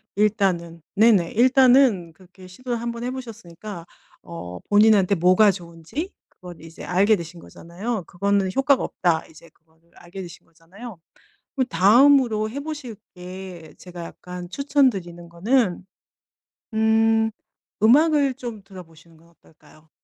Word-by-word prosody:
일단은. 190 -5 0
네네. 205 -5 +4
일단은 250 -7 +4
그렇게 185 +2 -17
시도를 240 +6 -5
한번 235 0 -5
해 250 - -3
보셨으니까 215 -7 -9 0.4
어 90 - -9
본인한테 205 -2 +4
뭐가 185 +4 +4
좋은지 175 - -7 0.2
그걸 175 -2 -13
이제 165 0 -12
알게 200 +5 +2
되신 170 0 -9
거잖아요. 190 +7 -6
'그거는 200 +1 0
효과가 270 0 +2
없다.' 170 -3 -1
이제 160 +1 -17
그거를 160 +1 -35
알게 175 +3 -10
되신 175 -3 -12
거잖아요. 180 +6 -13 0.6
그럼 260 -3 0
다음으로 220 - +4
해 265 +6 -6
보실 295 -6 -7 0.2
게 180 -2 -10
제가 175 -2 -10
약간 180 +1 -10
추천 280 +4 +2
드리는 175 -5 -8
거는 185 +1 0 0.9
음 220 0 +2 0.5
음악을 285 +3 +4
좀 235 -6 -8
들어보시는 170 -4 -15
건 165 +1 -23
어떨까요? 160 -1 -24
195 Hz, 305 characters per minute, -22 LUFS, 170-235 Hz, 0.9 s, 네네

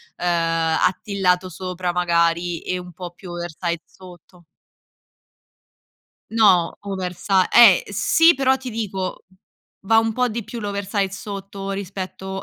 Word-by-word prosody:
ehm, 165 -2 0
attillato 185 -1 0
sopra 180 0 -4
magari 170 -1 +1
e 185 0 -3
un 180 -1 -11
po' 175 0 -8
più 175 +1 -13
oversize 170 0 -4
sotto. 180 -1 -16 1.9
No 200 -7 +4
oversi 190 -1 -5 0.2
eh 225 -6 +8
sì 325 - +4
però 265 0 +2
ti 260 -1 -7
dico, 200 -4 -4 0.6
va 225 +2 +4
un 225 0 +3
po' 250 +2 +1
di 230 -1 -4
più 230 +2 -7
l'oversize 200 -1 -2
sotto 195 -1 -7
rispetto, 190 0 -6
190 Hz, 120 wpm, -21 LUFS, 175-205 Hz, 1.9 s, eh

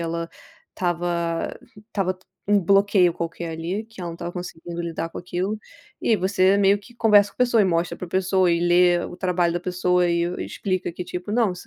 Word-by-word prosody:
ela 170 0 -3 0.5
estava 170 -2 -1 0.3
estava 190 -4 -1
t 185 - -28 0.2
um 205 0 +4
bloqueio 195 -1 +4
qualquer 165 0 -4
ali, 175 +7 -3
que 225 -4 -11
ela 170 - -4
não 165 - -7
estava 170 0 -5
conseguindo 175 -1 -6
lidar 165 -1 -3
com - - -12
aquilo. 185 +4 -3 0.4
E 225 - +2
você 190 0 +3
meio 200 0 +5
que 240 +4 -17
conversa 210 -3 +5
com - - -28
a - - -52
pessoa, 240 -3 +4
e - - +3
mostra 170 -2 0
para 180 - -6
pessoa, 185 0 +2
e 170 - +1
lê 175 0 +4
o - - -7
trabalho 180 -2 +1
da 175 - -1
pessoa, 180 0 +1
e 170 0 +1
o 180 - -5
explica 185 -3 -3
que, 180 - -5
tipo, 180 +3 -5
não 225 -4 +2
180 Hz, 205 wpm, -23 LUFS, 170-195 Hz, 0.5 s, meio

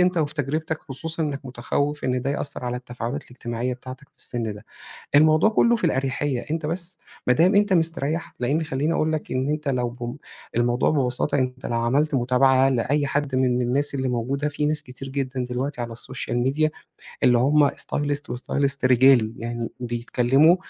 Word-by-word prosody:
أنت 180 -1 +3
وفي 155 -1 -1
تجربتك، 155 +2 -2
خصوصًا 160 +5 -1
إنّك 145 -2 -2
متخوّف 140 +4 -2
إن 125 -1 0
ده 135 - -1
يأثّر 145 -2 -3
على 125 0 -2
التفاعلات 125 +2 -5
الاجتماعية 125 0 -4
بتاعتك 130 +2 -11
في - - -44
السن 115 -3 -2
ده. 105 +2 -12 0.5
الموضوع 155 +7 +6
كُلّه 235 +2 +4
في 220 - -6
الأريحيّة. 135 -3 0
أنت 160 0 -2
بس 170 +2 -3 0.3
ما 125 - +6
دام 180 - +4
أنت 205 -1 +4
مستريّح، 165 -1 0
لإن 140 +6 +1
خلّيني 150 +1 -1
أقول 160 -1 +1
لك 155 - -4
إن 130 +2 0
أنت 150 0 -2
لو 125 -2 0
بم 120 +2 -6 0.4
الموضوع 120 +1 +2
ببساطة، 135 -1 +1
أنت 130 0 -3
لو 115 - -1
عملت 140 +6 +1
متابعة 130 +1 +4
لأي 135 +3 +1
حد 140 +1 -1
من 130 - +2
من 125 -1 +2
الناس 140 +4 0
اللي 130 -1 -1
موجودة، 130 +4 -1
في 150 +1 -2
ناس 150 0 0
كتير 130 +1 -9
جدًا 130 -2 -2
دلوقتي 125 +1 -3
على 120 -1 -4
السوشيال 120 +1 -4
ميديا 145 +5 +1 0.5
اللي 125 -1 +5
هم 145 +3 +4
stylist 145 0 -1
وstylist 140 +3 0
رجالي. 125 -3 +5
يعني 120 0 -4
بيتكلّموا 125 +6 +3
135 Hz, 180 wpm, -24 LUFS, 125-150 Hz, 0.5 s, الموضوع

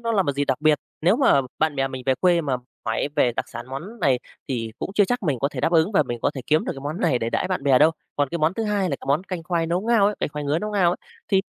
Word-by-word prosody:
nó 230 -1 -1
là 195 -3 +3
một 140 - -1
dịp 140 +1 -1
đặc 135 0 -1
biệt. 155 -1 +4 0.2
Nếu 180 +8 +4
mà 260 - +4 0.2
bạn 155 -2 +1
bè 135 0 +1
mình 130 -1 -6
về 130 - +4
quê 175 +2 +3
mà 135 -5 -1 0.3
hỏi 110 +5 0
về 120 - +3
đặc - - -2
sản 120 +1 -8
món 175 - -8
này 135 -7 +3 0.3
thì 115 -4 -3
cũng - - -4
chưa 205 0 +5
chắc 245 +2 -1
mình 145 -7 0
có 140 +4 +1
thể - - -6
đáp 165 - +1
ứng 165 +5 +3
và 155 - +4
mình 120 -3 -5
có - - +2
thể 135 - -4
kiếm 155 +1 +2
được - - -2
cái 135 - -9
món 150 +5 -4
này 135 -7 +2
để 115 0 -2
đãi 185 - -1
bạn 185 -6 -2
bè 135 -3 +5
đâu. 155 +2 +6 0.3
Còn 145 -2 +1
cái 170 - -3
món 160 +3 +2
thứ 225 - -2
hai 210 -2 0
là 140 - -1
cái - - -11
món 145 +6 +2
canh 180 -4 -5
khoai 170 -1 -1
nấu 175 +2 0
ngao 225 -2 +3
ấy, 210 - +1
canh - - 0
khoai 150 0 -5
ngứa 145 +3 +1
nấu 210 +4 -4
ngao 190 -5 +3
ấy - - -2 0.3
thì 195 -1 +3
155 Hz, 325 wpm, -23 LUFS, 135-190 Hz, 0.3 s, đâu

